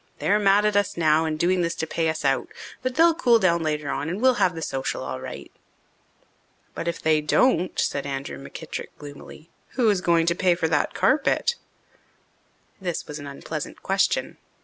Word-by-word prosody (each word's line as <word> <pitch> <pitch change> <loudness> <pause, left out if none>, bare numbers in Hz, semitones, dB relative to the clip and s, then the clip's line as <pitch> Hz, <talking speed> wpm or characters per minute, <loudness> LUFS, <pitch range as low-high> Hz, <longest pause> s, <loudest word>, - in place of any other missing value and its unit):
"They're 210 +2 +2
mad 205 0 +4
at 210 -1 +1
us 205 -3 +1
now 160 -1 +3
and 155 -1 -2
doing 180 +3 +2
this 170 -1 -1
to - - -2
pay 160 0 -1
us 160 -2 -3
out. 135 0 +1 0.3
But 255 0 -3
they'll 330 +1 +5
cool 240 -7 +4
down 170 -5 +2
later 150 -2 -2
on 150 - -3
and 180 +4 -3
we'll 260 +2 +5
have 180 -2 +3
the 160 - -5
social 135 - -3
all 65 0 -5
right." - - -8 1.2
"But 165 - -5
if 170 - -2
they 155 -1 +2
don't," 180 - +2
said 140 0 -1
Andrew 135 - -5
McKittrick 70 - -7
gloomily, 145 +2 -12 0.2
"who 245 -3 +2
is 195 -3 0
going 170 -2 +3
to 170 - +2
pay 180 0 +2
for 165 -2 0
that 150 -2 0
carpet?" 305 - +2 1.3
This 175 -3 -3
was 150 0 -7
an 145 - -8
unpleasant 140 0 -7
question. - - 0
170 Hz, 190 wpm, -24 LUFS, 150-200 Hz, 1.3 s, they'll